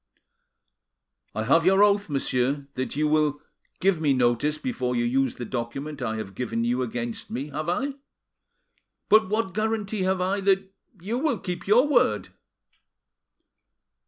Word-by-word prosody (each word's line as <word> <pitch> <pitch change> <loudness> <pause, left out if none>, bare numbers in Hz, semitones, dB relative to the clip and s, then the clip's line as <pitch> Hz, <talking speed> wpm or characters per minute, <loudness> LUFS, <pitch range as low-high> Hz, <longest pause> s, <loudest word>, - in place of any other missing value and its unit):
"I 110 - -1
have 155 +8 +4
your 195 +3 +5
oath, 200 -2 +3
monsieur, 135 0 0
that 130 +1 -4
you 150 +1 +1
will 150 -1 +2 0.4
give 185 -4 +2
me 145 -3 +3
notice 125 +5 +1
before 130 - -2
you 120 0 +1
use 130 +1 +1
the 120 - -6
document 130 +5 -5
I 110 -3 -2
have 110 -3 -6
given 115 +2 -2
you 120 +2 0
against 120 -1 -4
me, 140 +4 -4
have 155 +3 -4
I? 270 +10 -1 1.2
But 215 -2 +5
what 215 -3 -1
guarantee 215 -1 -1
have 185 0 +1
I 190 +2 0
that 195 0 +1 0.3
you 215 +8 -3
will 285 -5 +1
keep 180 -1 -6
your 240 +7 +5
word?" 290 - +2
155 Hz, 150 wpm, -25 LUFS, 125-195 Hz, 1.2 s, your